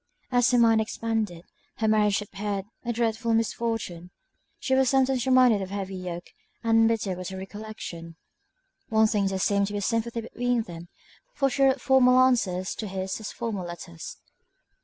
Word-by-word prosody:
As 245 0 +4
her 250 - +3
mind 225 -2 +5
expanded, 220 -5 -3 0.3
her 220 - 0
marriage 210 -1 +3
appeared 200 -1 -4 0.2
a 240 - -1
dreadful 230 0 0
misfortune; 225 -6 -2 0.5
she 265 - -2
was 265 -1 +4
sometimes 265 -1 +2
reminded 255 -5 +5
of 190 - -5
the 200 - -5
heavy 195 -1 -4
yoke, 180 -1 -6 0.4
and 225 0 +4
bitter 215 -5 0
was 180 0 -6
the 190 - -7
recollection! 190 -4 -8 0.7
In 225 - -5
one 220 - +6
thing 210 -2 +1
there 195 0 -1
seemed 200 +1 +1
to 205 - -6
be - - -2
a - - -2
sympathy 230 +2 -1
between 245 +1 -1
them, 170 -3 -10 0.5
for 275 -1 +1
she 275 - -2
wrote 270 -1 +4
formal 255 -2 +5
answers 205 -8 +2
to 215 - -4
his 190 +1 -4
as 215 - -6
formal 210 -6 -4
letters. 170 - -8
220 Hz, 180 wpm, -26 LUFS, 190-235 Hz, 0.7 s, one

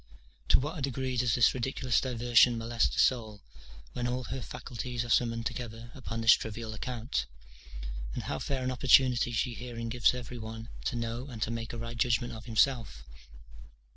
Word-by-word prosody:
To - - +6
what 150 +4 -4
a - - -5
degree 130 -1 -2
does 120 -2 +2
this 120 -3 +5
ridiculous 130 -1 0
diversion 120 -1 +4
molest 115 0 +1
the - - -5
soul, 110 -6 +2 0.5
when 120 0 -2
all 125 +1 -2
her 130 +3 -5
faculties 120 0 -5
are 120 - -4
summoned 115 -1 +2
together 120 -1 -5
upon 115 -3 -5
this 115 0 +8
trivial 110 0 -3
account! 115 - -3 0.9
and - - -3
how 75 - -3
fair 135 - -2
an 130 - 0
opportunity 125 -1 +4
she 120 +2 0
herein 115 -1 -6
gives 120 +1 +3
every 125 0 -6
one 110 +1 -7 0.2
to - - -1
know 115 +2 -3
and 120 -6 -8
to 110 - -2
make 115 0 -4
a 120 - -6
right 115 +1 -5
judgment 120 0 +1
of 110 0 -9
himself? 110 - +1
120 Hz, 180 wpm, -30 LUFS, 115-125 Hz, 0.9 s, this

